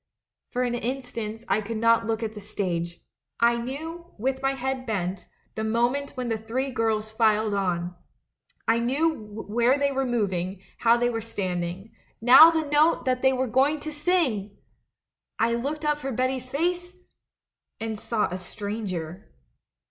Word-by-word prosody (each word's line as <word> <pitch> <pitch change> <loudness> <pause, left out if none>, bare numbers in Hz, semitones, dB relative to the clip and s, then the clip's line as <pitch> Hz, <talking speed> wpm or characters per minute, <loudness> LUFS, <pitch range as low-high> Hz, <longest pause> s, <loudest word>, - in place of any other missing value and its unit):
For 250 0 -1
an 245 -1 0
instant 235 -3 -4
I 195 +2 +2
could 220 +2 -4
not 230 0 +3
look 225 0 -1
at 220 -1 -3
the 210 - -9
stage. 175 -4 -3 0.4
I 235 0 +4
knew, 320 +8 -6
with 265 +4 -1
my 270 0 +1
head 265 0 -3
bent, 190 -3 -2 0.3
the 220 - -3
moment 240 +6 0
when 250 -1 -2
the 225 -2 -1
three 255 +5 -2
girls 220 -2 0
filed 220 -1 +2
on; 180 -3 -1 0.7
I 225 +1 +4
knew 280 +8 +2 0.3
where 240 +5 +3
they 280 0 +1
were 270 -1 0
moving, 190 -5 -1 0.2
how 230 0 +5
they 240 0 +1
were 225 -1 -2
standing 185 -2 -3
— - - -38
now 250 +8 +9
the 320 -1 0
note 295 +3 +3
that 255 -1 +1
they 265 - +5
were 260 0 0
going 270 +5 +2
to 310 - -5
sing! 295 - 0 0.8
I 230 +1 +2
looked 285 +6 -2
up 295 0 +1
for 270 -2 -4
Betty's 255 +1 -1
face 355 +5 -1 0.4
— - - -62
and 220 -1 -4
saw 215 -2 0
a 180 - -3
stranger. 190 -3 -5
235 Hz, 165 wpm, -26 LUFS, 215-265 Hz, 0.8 s, now